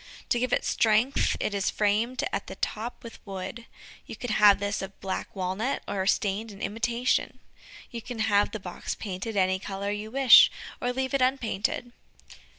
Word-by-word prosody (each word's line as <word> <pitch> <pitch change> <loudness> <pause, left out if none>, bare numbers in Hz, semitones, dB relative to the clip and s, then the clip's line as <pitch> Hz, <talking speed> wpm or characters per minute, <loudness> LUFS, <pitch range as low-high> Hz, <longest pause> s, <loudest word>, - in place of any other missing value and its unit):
To 240 - +2
give 250 +1 -1
it - - +1
strength 225 +5 +2
it 210 - -1
is 200 -1 0
framed 220 +5 0
at 195 - -2
the 190 - -7
top 225 +5 -4
with 230 - -11
wood. 195 +4 -7 0.4
You - - -7
can 245 -3 -5
have 210 -1 +6
this 200 0 -2
of 195 0 -8
black 190 -1 -3
walnut, 190 +8 -2
or 190 -1 -2
stained 210 +2 0
in 195 - -12
imitation. 235 +4 -1 0.5
You 235 -2 -5
can 245 +1 -7
have 205 -2 +2
the 215 - -6
box 180 -2 -5
painted 205 +2 -5
any 185 0 +2
color 200 +1 -4
you 210 +1 -4
wish, 260 0 +8 0.3
or 245 - 0
leave 260 +1 -2
it 275 - +2
unpainted. 245 -2 0
215 Hz, 175 wpm, -27 LUFS, 195-240 Hz, 0.5 s, wish